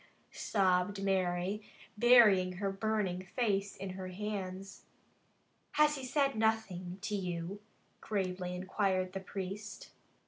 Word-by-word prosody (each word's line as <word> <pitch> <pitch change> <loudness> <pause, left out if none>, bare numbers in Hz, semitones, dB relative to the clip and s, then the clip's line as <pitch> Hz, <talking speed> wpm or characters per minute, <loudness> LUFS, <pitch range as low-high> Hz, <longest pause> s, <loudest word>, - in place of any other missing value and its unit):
sobbed 195 0 +1
Mary, 190 +1 0 0.3
burying 210 -6 +6
her 195 +2 -2
burning 195 -3 -1
face 200 -1 -1
in 195 -1 -5
her 185 0 -6
hands. 195 -1 -5 0.9
"Has 300 0 +5
he 270 - -6
said 275 +1 +1
nothing 215 -5 0
to 210 - -3
you?" 180 +1 -4 0.4
gravely 185 -3 -2
inquired 185 0 0
the 195 - -3
priest. 195 +2 -6
195 Hz, 110 wpm, -33 LUFS, 185-210 Hz, 0.9 s, burying